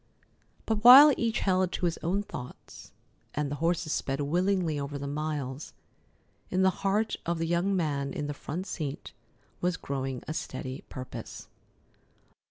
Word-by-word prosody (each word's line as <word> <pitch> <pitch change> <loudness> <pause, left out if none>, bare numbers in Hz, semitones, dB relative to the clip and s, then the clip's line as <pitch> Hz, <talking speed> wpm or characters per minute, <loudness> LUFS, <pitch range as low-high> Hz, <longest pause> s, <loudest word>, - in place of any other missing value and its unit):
But 220 -1 -1
while 275 +5 +11
each 230 0 -1
held 185 -1 +2
to - - -1
his 170 -1 -1
own 195 +5 -1
thoughts, 125 -10 -10 0.4
and 145 -1 -1
the 145 - -3
horses 165 -2 0
sped 135 +1 -2
willingly 175 +1 +1
over 140 0 -4
the 140 - -5
miles, 145 -1 -4 0.8
in 185 +1 +1
the 190 - +5
heart 205 +3 +1
of 170 0 -1
the 165 - -1
young 175 +4 +1
man 145 -5 -1
in 145 - -4
the 145 - -3
front 175 +5 -5
seat 150 -7 -5 0.5
was 180 0 0
growing 135 -2 -4
a 155 - -3
steady 130 -4 -5
purpose. 125 -3 -8
160 Hz, 155 wpm, -29 LUFS, 140-185 Hz, 0.8 s, while